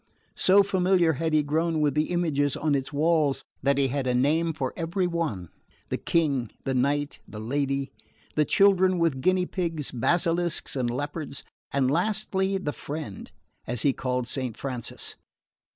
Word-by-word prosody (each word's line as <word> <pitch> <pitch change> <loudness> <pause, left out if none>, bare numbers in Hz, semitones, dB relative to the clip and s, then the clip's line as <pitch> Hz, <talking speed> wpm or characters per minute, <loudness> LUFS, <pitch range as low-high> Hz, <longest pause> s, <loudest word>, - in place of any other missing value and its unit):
So 200 +2 +6
familiar 185 -3 +3
had 160 +3 -1
he 155 -1 +3
grown 160 +2 0
with 150 -1 +2
the 150 +1 0
images 155 -6 +1
on 155 -1 0
its 135 -1 -1
walls 150 -1 +2 0.2
that 140 0 +2
he 135 -1 +2
had 135 0 -1
a 125 - +2
name 155 +6 +2
for 135 -5 -3
every 170 +3 -1
one: 160 - -2 0.4
the - - -1
King, 140 -8 +1
the 135 - -1
Knight, 140 +3 0
the 105 - -8
Lady, 140 +4 -1 0.4
the 155 - +3
children 190 +1 +4
with 165 -6 +1
guinea 185 +3 +3
pigs, 165 -6 -2
basilisks 170 +7 0
and 125 -3 0
leopards, 145 +3 -4 0.3
and 135 -2 +2
lastly 195 +2 0
the 150 -6 -3
Friend, 145 - -7 0.4
as 120 -1 -2
he 140 - +4
called 125 -1 -2
Saint 125 -3 -4
Francis. 125 -4 -5
150 Hz, 160 wpm, -26 LUFS, 135-170 Hz, 0.4 s, So